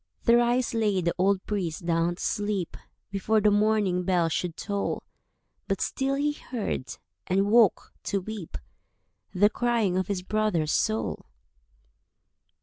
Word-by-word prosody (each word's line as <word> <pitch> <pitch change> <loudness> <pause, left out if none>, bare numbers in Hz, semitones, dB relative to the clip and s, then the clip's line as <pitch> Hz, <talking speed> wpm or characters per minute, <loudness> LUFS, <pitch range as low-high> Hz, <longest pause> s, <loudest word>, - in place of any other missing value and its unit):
Thrice 240 +1 +3
lay 215 -4 +1
the 170 -1 0
old 195 +1 +2
priest 180 -6 -3
down 170 0 +1
to - - -8
sleep 205 -4 -1 0.4
Before 210 +2 +1
the 210 0 +4
morning 205 -3 +2
bell 175 -2 +1
should 170 +1 -2
toll; 200 -1 -2 0.6
But - - -1
still 270 +1 -1
he 290 +2 +1
heard—and 195 - -3
woke 225 -4 +4
to 200 - 0
weep— 200 -2 -7 0.8
The 205 +3 +4
crying 230 -6 +1
of 185 - -2
his 190 -3 -2
brother's 190 -7 0
soul. 110 -1 -1
200 Hz, 130 wpm, -27 LUFS, 175-220 Hz, 0.8 s, the